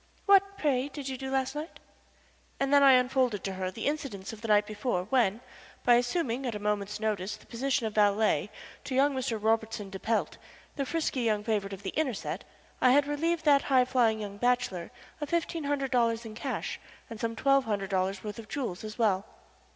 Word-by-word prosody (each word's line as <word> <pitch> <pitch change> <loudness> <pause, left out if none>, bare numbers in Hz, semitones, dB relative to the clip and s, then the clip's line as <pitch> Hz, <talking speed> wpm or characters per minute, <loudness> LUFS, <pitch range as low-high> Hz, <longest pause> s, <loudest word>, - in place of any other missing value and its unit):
What, 395 0 +4
pray, 280 -5 +1
did 285 -1 -7
you 265 - -3
do 265 +1 -5
last 265 0 0
night?" 300 +3 -7 0.8
And 275 +1 +1
then 285 - +7
I 275 -1 +8
unfolded 250 -4 +2
to 195 - -3
her 185 0 -3
the 215 +4 -6
incidents 275 -10 -3
of 215 - -11
the 225 - -5
night 210 -1 +4
before 210 -3 -2
when, 235 -4 +2 0.4
by 245 - +6
assuming 245 +1 +1
at 230 - -3
a - - -4
moment's 210 0 -2
notice 210 -3 -2
the - - -19
position 260 +1 -1
of 215 - -3
valet 210 +1 +3 0.4
to 260 - -3
young 280 +2 +4 0.2
Robertson 220 -2 -1
de 190 - -6
Pelt, 225 +2 -1 0.4
the 275 -2 -2
frisky 315 -5 -1
young 215 -3 +1
favorite 210 -3 -1
of 195 +1 -9
the 190 - -3
inner 285 -6 0
set, - - -5 0.4
I 255 0 +6
had 285 +1 +5
relieved 320 +3 -1
that 285 -2 +6
high 260 -2 +3
flying 230 -4 +2
young 200 -1 -6
bachelor 245 -7 0 0.3
of 295 - -3
fifteen 335 -2 -1
hundred 280 -2 -1
dollars 230 -2 +1
in 220 - -7
cash 220 - -4 0.3
and 225 -2 -9
some 230 0 -2
twelve 275 +1 +3
hundred 200 -3 -2
dollars 190 +1 0
worth 210 +1 -6
of 220 - -10
jewels 235 -11 -4
as 215 0 -7
well. 200 -4 +1
235 Hz, 205 wpm, -29 LUFS, 210-275 Hz, 0.8 s, I